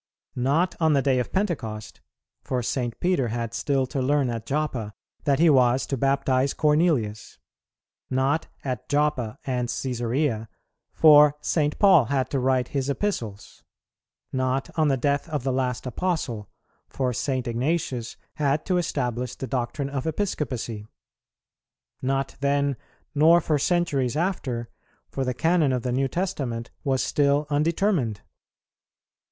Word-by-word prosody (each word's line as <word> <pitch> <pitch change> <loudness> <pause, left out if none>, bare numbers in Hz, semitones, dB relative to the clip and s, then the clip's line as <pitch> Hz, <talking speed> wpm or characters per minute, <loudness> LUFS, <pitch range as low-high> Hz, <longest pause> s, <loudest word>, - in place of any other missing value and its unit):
Not 145 +9 +1
on 160 -2 +3
the 140 -2 +2
day 130 -2 +2
of 125 - -3
Pentecost, 140 - -3 0.4
for 125 -2 -2
St. 120 -1 -2
Peter 175 -9 +1
had 115 0 -3
still 135 +1 0
to 135 +1 -3
learn 135 -1 +1
at 115 -1 -5
Joppa 135 -8 -2 0.3
that 140 -2 +3
he 170 - +5
was 130 -3 +4
to 140 - -2
baptize 135 0 +1
Cornelius; 150 -9 +1 0.7
not 135 +4 +1 0.2
at 125 -4 -4
Joppa 145 -5 0
and 125 -2 -1
Cæsarea, 120 -1 -1 0.4
for 150 -2 +7
St. 150 -1 0
Paul 185 - +6
had 130 +1 -1
to 135 - 0
write 130 -1 +1
his 140 -1 -2
Epistles; 120 - -3 0.7
not 130 +1 -1
on 155 -2 +3
the 135 -2 +2
death 140 +2 0
of 150 -5 -2
the 135 -1 0
last 125 -2 -1
Apostle, 125 - -2 0.4
for 130 -2 -1
St. 130 +1 -2
Ignatius 125 -1 -2 0.2
had 145 0 +1
to 185 -2 +1
establish 125 -6 -2
the - - -5
doctrine 130 +2 -3
of 140 +1 -3
Episcopacy; 130 - -3 1.1
not 135 0 -1
then, 140 0 +1 0.4
nor 160 +3 +6
for 155 -2 0
centuries 145 -6 +1
after, 135 -10 -2 0.4
for 135 - -3
the 125 -1 -2
Canon 160 0 +2
of 125 -2 -1
the 125 - -1
New 135 +2 +1
Testament 130 -9 -3
was 135 -3 +1
still 145 +1 +2
undetermined. 150 - +1
135 Hz, 140 wpm, -25 LUFS, 125-150 Hz, 1.1 s, for